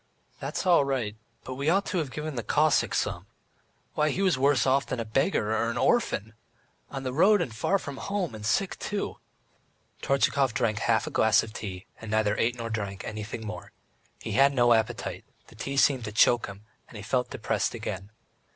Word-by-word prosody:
"That's -, -, -4 dB
all 175 Hz, -5 st, +5 dB
right, 125 Hz, -6 st, -2 dB, 0.3 s
but 130 Hz, -, -6 dB
we 140 Hz, +4 st, -1 dB
ought 195 Hz, +3 st, +3 dB
to 180 Hz, -, -1 dB
have 150 Hz, -4 st, -2 dB
given 150 Hz, +3 st, -5 dB
the 120 Hz, -, -3 dB
Cossack 150 Hz, +4 st, +2 dB
some.... -, -, -2 dB, 0.7 s
Why, 150 Hz, 0 st, +2 dB
he 190 Hz, +7 st, -1 dB
was 185 Hz, -5 st, +3 dB
worse 135 Hz, 0 st, +3 dB
off 135 Hz, +1 st, +2 dB
than 125 Hz, -, -3 dB
a 115 Hz, -, -2 dB
beggar 110 Hz, -, +1 dB
or 115 Hz, +1 st, 0 dB
an 115 Hz, -, -3 dB
orphan. 120 Hz, -, +1 dB, 0.6 s
On 135 Hz, -1 st, -6 dB
the 130 Hz, -1 st, -3 dB
road, 200 Hz, +8 st, +5 dB
and 115 Hz, -, -3 dB
far 190 Hz, -, +1 dB
from 140 Hz, -7 st, -7 dB
home, 200 Hz, -, -2 dB
and 110 Hz, -1 st, -8 dB
sick 110 Hz, -, 0 dB
too." 205 Hz, -1 st, -3 dB, 0.8 s
Tortchakov 140 Hz, -2 st, +2 dB
drank 110 Hz, -4 st, +1 dB
half 115 Hz, -1 st, +2 dB
a -, -, -5 dB
glass 110 Hz, -1 st, +4 dB
of 110 Hz, -, -9 dB
tea, 95 Hz, -4 st, -6 dB, 0.2 s
and 115 Hz, -, -7 dB
neither 110 Hz, -1 st, +2 dB
ate 120 Hz, +2 st, +1 dB
nor 115 Hz, -1 st, -4 dB
drank 100 Hz, -3 st, -4 dB
anything 110 Hz, +1 st, -6 dB
more. 110 Hz, -, -7 dB, 0.5 s
He 110 Hz, -, -6 dB
had 135 Hz, +5 st, +4 dB
no 120 Hz, -1 st, +5 dB
appetite, 110 Hz, +1 st, -1 dB, 0.3 s
the -, -, -16 dB
tea 140 Hz, 0 st, -4 dB
seemed 135 Hz, -4 st, +3 dB
to 105 Hz, -, -5 dB
choke 120 Hz, +3 st, +4 dB
him, 100 Hz, +1 st, -10 dB, 0.2 s
and 115 Hz, -, -11 dB
he 105 Hz, -, -8 dB
felt 125 Hz, +4 st, 0 dB
depressed -, -, -1 dB
again. 95 Hz, +2 st, -5 dB
125 Hz, 200 wpm, -27 LUFS, 110-140 Hz, 0.8 s, all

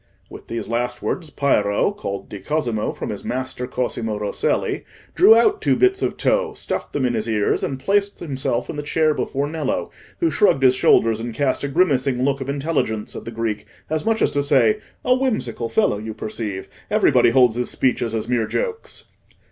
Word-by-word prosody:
With -, -, -11 dB
these 115 Hz, -, -4 dB
last 120 Hz, +2 st, -2 dB
words 165 Hz, -4 st, -3 dB
Piero 105 Hz, -, +1 dB
(called 100 Hz, -, -6 dB
"di 105 Hz, -, -8 dB
Cosimo," 120 Hz, -6 st, -1 dB
from -, -, -5 dB
his 105 Hz, -, -6 dB
master, 125 Hz, 0 st, -3 dB
Cosimo 120 Hz, -4 st, -2 dB
Rosselli) 105 Hz, -1 st, -1 dB, 0.3 s
drew 225 Hz, -, +7 dB
out 315 Hz, -, +3 dB
two -, -, +3 dB
bits 380 Hz, +1 st, +2 dB
of -, -, -1 dB
tow, -, -, +1 dB
stuffed -, -, -4 dB
them 140 Hz, -3 st, 0 dB
in 120 Hz, -, +1 dB
his 110 Hz, 0 st, -2 dB
ears, 105 Hz, -2 st, +1 dB
and 135 Hz, -2 st, -2 dB
placed 200 Hz, +7 st, 0 dB
himself 130 Hz, -6 st, -2 dB
in 150 Hz, -, -6 dB
the -, -, -2 dB
chair 155 Hz, +1 st, +1 dB
before 140 Hz, -1 st, -2 dB
Nello, 155 Hz, 0 st, -2 dB, 0.3 s
who 335 Hz, -2 st, +2 dB
shrugged 140 Hz, -10 st, +3 dB
his 130 Hz, -1 st, +6 dB
shoulders 115 Hz, -3 st, +3 dB
and 115 Hz, 0 st, -5 dB
cast 140 Hz, -1 st, 0 dB
a -, -, 0 dB
grimacing 135 Hz, -5 st, +1 dB
look 140 Hz, 0 st, 0 dB
of 135 Hz, -, -4 dB
intelligence 140 Hz, -7 st, -2 dB
at -, -, -7 dB
the -, -, -5 dB
Greek, 110 Hz, -2 st, -3 dB, 0.2 s
as 155 Hz, -1 st, 0 dB
much 225 Hz, 0 st, +1 dB
as -, -, +2 dB
to 145 Hz, -, 0 dB
say, 130 Hz, -6 st, +3 dB, 0.3 s
"A 250 Hz, -, +5 dB
whimsical 250 Hz, -, -1 dB
fellow, 105 Hz, -2 st, +1 dB
you 110 Hz, 0 st, -6 dB
perceive! 105 Hz, -3 st, -5 dB, 0.2 s
Everybody -, -, +4 dB
holds 125 Hz, -2 st, +4 dB
his 125 Hz, 0 st, -1 dB
speeches 120 Hz, -3 st, 0 dB
as 110 Hz, -, -3 dB
mere 120 Hz, -3 st, 0 dB
jokes." 460 Hz, -2 st, -4 dB
130 Hz, 195 wpm, -21 LUFS, 115-155 Hz, 0.3 s, drew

